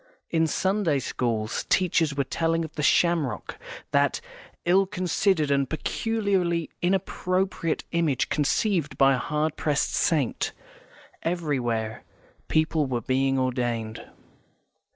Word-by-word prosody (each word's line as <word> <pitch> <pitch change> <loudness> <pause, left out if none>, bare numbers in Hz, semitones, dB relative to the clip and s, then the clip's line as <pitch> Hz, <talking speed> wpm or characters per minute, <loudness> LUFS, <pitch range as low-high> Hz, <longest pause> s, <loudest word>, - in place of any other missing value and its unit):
In 160 -1 +2
Sunday 190 -2 +1
schools, 115 -4 -2
teachers 165 -5 +2
were 140 - +1
telling 165 +4 0
of 155 - -10
the 150 - -4
shamrock, 155 - +1 0.3
that - - +2 0.5
ill 190 +3 +4
considered 185 -4 +1
and 140 -1 +2
peculiarly 185 -2 -1
inappropriate 185 -1 0
image 165 -6 +1
conceived 150 -1 0
by 135 0 +5
a 130 - 0
hard 150 +1 -1
pressed 150 -2 0
saint. 145 -8 +1 0.7
Everywhere 125 -10 -2 0.4
people 155 -2 +1
were 125 -2 -2
being 135 +3 +1
ordained. 120 -4 -2
155 Hz, 110 wpm, -26 LUFS, 135-175 Hz, 0.7 s, by